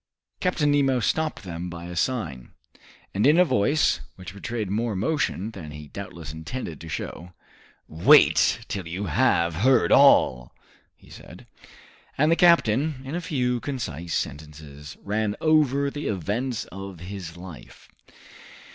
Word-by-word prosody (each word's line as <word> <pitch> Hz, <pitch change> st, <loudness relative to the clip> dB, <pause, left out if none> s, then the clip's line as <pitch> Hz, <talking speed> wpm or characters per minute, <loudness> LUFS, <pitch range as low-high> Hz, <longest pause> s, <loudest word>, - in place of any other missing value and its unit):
Captain 165 Hz, -5 st, +1 dB
Nemo 135 Hz, -3 st, +2 dB
stopped 155 Hz, +5 st, -1 dB
them 90 Hz, -1 st, -6 dB
by 85 Hz, 0 st, -8 dB
a 90 Hz, 0 st, -7 dB
sign, 85 Hz, -, -3 dB, 0.6 s
and 105 Hz, +6 st, +2 dB
in 150 Hz, +3 st, +5 dB
a 180 Hz, -, +6 dB
voice 140 Hz, -, +2 dB, 0.2 s
which 95 Hz, 0 st, -10 dB
betrayed 110 Hz, +2 st, -4 dB
more 115 Hz, +2 st, -1 dB
emotion 110 Hz, -, -1 dB
than 85 Hz, -8 st, -9 dB
he 75 Hz, 0 st, -10 dB
doubtless 85 Hz, -6 st, -8 dB
intended 80 Hz, -, -7 dB
to 80 Hz, -, -9 dB
show. 90 Hz, +3 st, -6 dB, 0.5 s
"Wait 80 Hz, +2 st, +4 dB
till 95 Hz, -4 st, -5 dB
you 90 Hz, +5 st, -4 dB
have 85 Hz, 0 st, +2 dB
heard 125 Hz, +5 st, +3 dB
all," 60 Hz, -1 st, +5 dB, 0.4 s
he -, -, -20 dB
said. -, -, -13 dB, 0.7 s
And 150 Hz, +3 st, +3 dB
the -, -, +5 dB
captain, 150 Hz, -5 st, +3 dB
in 135 Hz, -, -6 dB
a 175 Hz, -, -2 dB
few 125 Hz, -8 st, -1 dB
concise 85 Hz, -, -4 dB
sentences, 75 Hz, 0 st, -8 dB
ran 105 Hz, +1 st, -1 dB
over 140 Hz, -3 st, +2 dB
the 145 Hz, +1 st, -5 dB
events 105 Hz, +6 st, -2 dB
of 95 Hz, -2 st, -9 dB
his 90 Hz, -3 st, -8 dB
life. 90 Hz, -3 st, -12 dB
100 Hz, 140 wpm, -25 LUFS, 85-135 Hz, 0.7 s, a